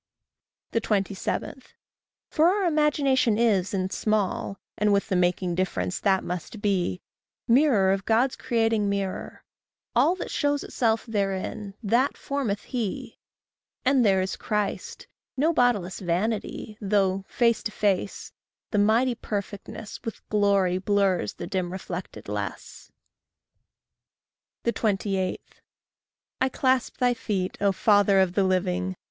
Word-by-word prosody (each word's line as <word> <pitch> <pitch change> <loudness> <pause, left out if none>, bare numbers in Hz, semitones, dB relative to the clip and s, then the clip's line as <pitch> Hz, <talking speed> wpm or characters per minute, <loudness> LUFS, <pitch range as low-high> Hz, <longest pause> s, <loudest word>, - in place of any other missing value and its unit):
27. 210 +3 -1 0.7
For 320 +2 +3
out 390 0 +1
imagination 280 -7 +2
is, 205 -5 +2
in 190 -1 -1
small, 205 -2 -1 0.2
And 210 0 +2
with 200 +1 +1
the 190 - +1
making 180 0 +1
difference 185 0 -1
that 190 -2 +2
must 180 +4 -5
be, 185 - 0 0.4
Mirror 235 -7 +4
of 195 0 -1
God's 240 +4 +2
creating 225 -3 +1
mirror; 200 -1 -3 0.5
all 355 - +4
That 370 - -6
shows 290 -1 0
itself 225 -3 0
therein, 200 -2 -3
that 240 +7 +2
formeth 255 -8 -2
he, 230 -6 -4 0.7
And 260 -1 +4
there 195 -3 +4
is 190 - -2
Christ, 210 -2 -3 0.3
no 315 +5 +3
bodiless 210 - +1
vanity, 210 +3 -2
Though, 195 -2 +1
face 235 -2 +2
to 215 - -3
face, 200 -2 -1 0.4
the 210 - +2
mighty 230 +5 +3
perfectness 205 -1 -6
With 225 - -7
glory 200 -3 +2
blurs 195 - +1
the - - -6
dim 185 -2 -2
reflected 185 -1 -7
less. 100 -3 -6 1.7
28. 195 -5 0 1.0
I 260 - +3
clasp 260 -1 +1
thy 245 -1 +3
feet, 195 -5 -2
O 200 -1 +4
father 205 0 +4
of 190 -2 +2
the 195 - +2
living! 185 0 0
205 Hz, 120 wpm, -26 LUFS, 190-235 Hz, 1.7 s, Mirror